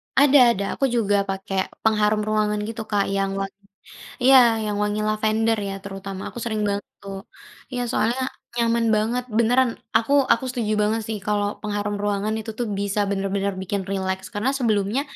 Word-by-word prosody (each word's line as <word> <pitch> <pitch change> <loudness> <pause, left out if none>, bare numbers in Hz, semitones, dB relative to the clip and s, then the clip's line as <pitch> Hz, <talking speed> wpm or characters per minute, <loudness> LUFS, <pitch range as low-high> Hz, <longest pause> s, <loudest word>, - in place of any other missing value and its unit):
Ada 285 0 +6
ada, 200 - -3
aku 275 - 0
juga 205 -3 +2
pakai 195 0 -3 0.3
pengharum 215 -1 +2
ruangan 210 -1 +1
gitu 225 0 -5
Kak 205 -2 +2
yang 195 0 0
wangi 195 0 -4 0.7
iya, 265 +1 +8 0.3
yang 210 -1 -2
wangi 210 +1 -1
lavender 220 +1 +1
ya - - -4
terutama, 195 -1 -7
aku - - -12
sering 220 -2 -2
banget 200 0 -2 0.2
tuh. 195 -1 -6 0.5
Iya, 245 -1 -2
soalnya 240 +3 +1 0.3
nyaman 235 0 +2
banget 235 +4 0
beneran, 245 +2 +4 0.3
aku 230 +5 -3 0.2
aku 245 - +3
setuju 230 -4 -2
banget 220 +2 +1
sih 220 -1 -2
kalau 205 -1 +1
pengharum 205 -1 -2
ruangan 205 +1 0
itu 220 +1 -6
tuh 240 - -1
bisa 200 +1 -1
bener-bener 195 0 -1
bikin 195 +1 -2
rileks 190 -1 -2
karena 210 +6 0
sebelumnya, 215 +1 +1
210 Hz, 165 wpm, -23 LUFS, 200-230 Hz, 0.7 s, iya